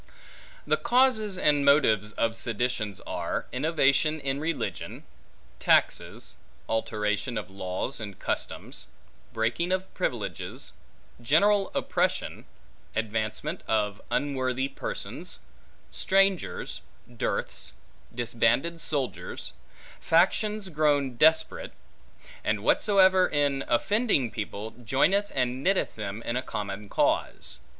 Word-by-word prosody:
The - - +2
causes 240 -6 +3
and 145 -4 +3
motives 110 -8 +4
of 115 0 0
seditions 115 -2 -1
are, - - -3
innovation 150 +2 +2
in 140 -1 -2
religion; 165 +2 -3 0.6
taxes; - - +1 0.3
alteration 110 +1 -1
of 105 -2 -5
laws 95 +7 -4
and 100 -4 -7
customs; - - -4 0.4
breaking 120 +11 0
of 185 0 -2
privileges; - - -4 0.5
general 195 - +3
oppression; - - -1 0.5
advancement 110 - -2
of 105 -2 0
unworthy 130 -2 0
persons; - - -6 0.5
strangers; 195 -1 +1 0.3
dearths; 120 -2 -3 0.4
disbanded 120 +7 +1
soldiers; 140 -4 -2 0.5
factions 210 +4 +2
grown 145 -5 +1
desperate; 160 - +3 0.7
and - - 0
what - - +3
soever, 190 -2 +5
in 145 -2 +1
offending 170 - +2
people, 110 0 -5
joineth 190 - +2
and 130 0 0
knitteth 195 0 +1
them 105 +1 -5
in 120 - -2
a 125 - +1
common 100 -3 -5
cause. - - 0
135 Hz, 100 wpm, -27 LUFS, 115-180 Hz, 0.7 s, soever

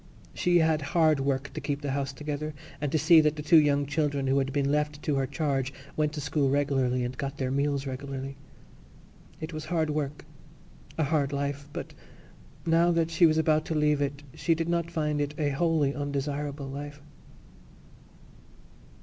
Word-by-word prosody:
She 175 0 +2
had 160 -2 +3
hard 155 0 +3
work 135 0 -1
to - - -5
keep 145 -1 -2
the 140 - -1
house 140 0 -1
together 150 +1 -5 0.3
and 145 -2 -1
to - - +2
see 160 +2 +7
that 155 0 +2
the 150 - -6
two 160 +2 +7
young 145 -1 +2
children 145 -1 0
who 135 +1 +3
had 135 0 -1
been 140 0 +1
left 150 0 -1
to 150 - 0
her 135 -1 0
charge 140 -3 -1 0.2
went 150 -1 +1
to 150 - -4
school 145 -1 +1
regularly 135 -3 +1
and 125 +1 -3
got 140 +1 -4
their 130 -2 -1
meals 140 0 0
regularly. 135 0 -5 1.0
It 160 +1 -6
was 155 -1 -5
hard 160 -3 0
work—a 150 +2 -6
hard 145 -1 +1
life—but 140 0 -4 0.7
now 165 +1 +4
that 165 -1 +1
she 165 +1 +5
was 155 0 +2
about 155 -1 +3
to 160 - -2
leave 150 -1 +2
it 140 +1 -2
she 165 - +1
did 165 +1 -2
not 170 -1 0
find 150 -3 -1
it 145 +1 -2
a 150 -2 +1
wholly 150 -1 +1
undesirable 145 0 -3
life. 145 +2 -7
145 Hz, 175 wpm, -28 LUFS, 140-155 Hz, 1.0 s, see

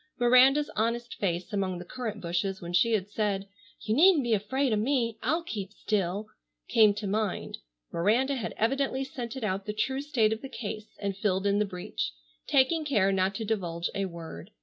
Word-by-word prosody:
Miranda's 255 +4 +5
honest 235 +2 -1
face 180 +1 -2
among 190 -3 -1
the 175 - -8
currant 220 -1 -5
bushes 180 +3 -1
when 175 0 -7
she 225 +6 +4
had 200 -3 +1
said, 205 -2 -1 0.3
"You 215 - -1
needn't 325 +2 +6
be 235 -2 +1
afraid 245 +5 +1
of 210 - +2
me, 230 -2 0
I'll 330 +2 0
keep 205 - -5
still," 205 -1 -1 0.4
came 215 -3 +5
to 210 0 -4
mind. 205 0 -2 0.3
Miranda 230 +11 +2
had 255 -5 -4
evidently 270 +3 +1
scented 250 -1 -6
out 195 -1 -2
the 210 - -2
true 265 +5 -1
state 235 -7 +2
of 220 - -6
the 270 - -7
case 215 -3 -7
and 200 -1 -3
filled 195 -1 0
in 200 0 +3
the 210 - +2
breach, 180 - -4 0.3
taking 295 +4 +3
care 210 -10 +2
not 190 0 +1
to 220 - -3
divulge 175 -6 -2
a 195 - -1
word. 165 - -8
215 Hz, 190 wpm, -28 LUFS, 195-250 Hz, 0.4 s, needn't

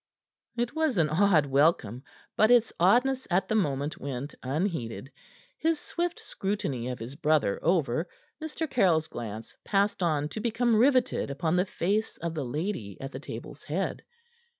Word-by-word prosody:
It 240 +4 -1
was 315 -8 +1
an 160 -3 +3
odd 170 -2 +4
welcome, 135 -5 +2 0.3
but 215 - +4
its 240 -2 +5
oddness 250 +9 +3
at 180 +2 +2
the - - -1
moment 145 -7 0
went 140 +1 -5
unheeded. 140 - -3 0.5
His 325 -1 +1
swift 345 0 -3
scrutiny 155 - -3
of 125 -1 -3
his 120 +5 -8
brother 150 -9 +2
over, 165 -2 +1 0.3
Mr. 315 +1 -3
Caryll's 180 - +2
glance 110 -1 -7
passed 200 0 +1
on 150 -4 +1
to 215 - -5
become 235 +1 +1
riveted 255 - +3
upon 160 +5 0
the 180 +1 +3
face 205 +4 -1
of 170 -1 -4
the 155 -3 -3
lady 130 - -3
at 135 +1 -6
the - - -6
table's - - -8
head. - - -2
170 Hz, 155 wpm, -28 LUFS, 140-220 Hz, 0.5 s, its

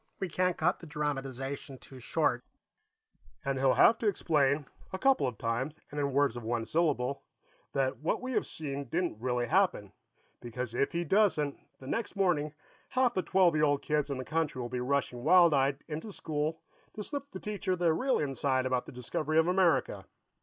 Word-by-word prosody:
We 190 - -2
can't 180 +2 0
cut 175 +4 +1
the 170 - -11
dramatization 135 -2 -4
too 130 +1 -12
short - - 0 0.5
" - - -33
"And 135 -1 -1
he'll 130 -1 +3
have 225 - +6
to 225 - 0
explain, 150 -7 +2 0.3
a 190 - -3
couple 265 - +3
of 125 -4 -5
times, 130 +8 -2
and 145 - -4
in 140 -1 0
words 140 -2 +2
of 120 - -5
one 115 0 -2
syllable, 140 -3 0 0.5
that 135 -1 0
what 155 - 0
we 255 +1 -5
have - - 0
seen 140 -2 -4
didn't 165 -4 -2
really 125 -1 0
happen, 170 - +1 0.5
because 120 0 -5
if 140 - +1
he 170 +1 0
doesn't, 170 -6 +2 0.2
the 130 - -12
next 225 - -3
morning 160 -6 +1 0.3
half 255 -2 +2
the 185 - 0
twelve 185 -2 +3
year 155 0 +3
old 145 -1 +1
kids 150 -1 0
in 140 - -2
the 130 - -5
country 160 -3 -1
will 120 -1 -4
be 125 +1 -3
rushing 125 -2 -1
wild 175 -1 +6
eyed 135 0 +1
into 160 +7 -5
school 160 -2 -3 0.3
to 210 - -4
slip 285 +3 -5
the - - -8
teacher 205 -3 -2
the 170 -2 +2
real 260 +10 +1
inside 135 -2 0
about 130 -1 -1
the - - -8
discovery 145 +5 -2
of 160 - +5
America. 175 - +2
150 Hz, 195 wpm, -30 LUFS, 130-175 Hz, 0.5 s, have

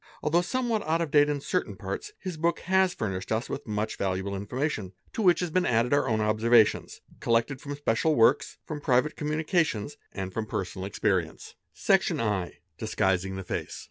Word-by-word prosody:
Although 165 +3 +3
somewhat 235 +2 -1
out 160 +1 +2
of 165 -4 -2
date 145 0 +5
in 145 -1 -1
certain - - -2
parts 425 - -5
his 185 -3 -5
book 165 +1 0
has 190 0 +3
furnished 95 -3 -4
us 110 +3 0
with 140 - -5
much 105 0 -2
valuable 95 +1 -2
information, 105 -1 -3 0.2
to - - -2
which 180 -4 +4
has 175 -2 -2
been 185 +2 +2
added 120 0 +2
our 145 - +2
own 110 -1 +1
observations 110 +1 +3 0.2
collected 115 +4 +1
from 145 0 -5
special 145 +2 +1
works, 120 +4 +3
from 150 -2 -5
private 130 +2 +2
communications, 150 - -1
and 95 -1 -5
from 110 -1 -3
personal 95 -2 -4
experience. 95 -5 -1 0.2
50 - - -39
Sil - - -16
Section - - +3
ii—Disguising 95 -2 -1
the 95 - -5
face. - - -4
125 Hz, 180 wpm, -27 LUFS, 105-155 Hz, 0.2 s, date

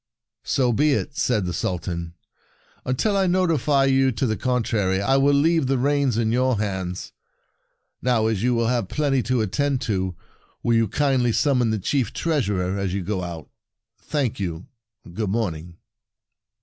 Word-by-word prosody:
" 110 +1 -63
So 125 -3 +2
be 145 +5 +3
it," 145 +1 -2
said 110 -6 +1
the 90 - -3
Sultan. 85 -2 -3 0.3
" - - -35
Until 165 - +1
I 195 -1 +2
notify 160 -7 +2
you 135 0 +3
to 120 - -1
the 110 -3 0
con 125 0 0
trary, 95 -4 0
I 115 +7 +2
will 140 +1 +4
leave 160 0 +3
the 135 0 +1
reins 140 -2 +1
in 110 -1 +1
your 125 0 +2
hands. 95 -3 -3 0.9
Now, 120 -3 +2
as 110 -3 0
you 125 0 +2
will 115 0 +1
have 120 -4 0
plenty 140 -3 +1
to 125 0 0
attend 140 +6 0
to, 95 -6 -2 0.5
will 115 - +2
you 115 -1 +3
kindly 130 0 +1
summon 125 -1 +2
the 110 - 0
Chief 120 +4 -1
Treasurer 100 - -1
as 95 -1 -2
you 100 - -2
go 95 +1 -2
out? 85 -3 -7 0.5
Thank 135 -8 -2
you. 85 -3 -4 0.5
Good 105 +1 -2
morning! 85 -6 -3
115 Hz, 175 wpm, -23 LUFS, 100-135 Hz, 0.9 s, will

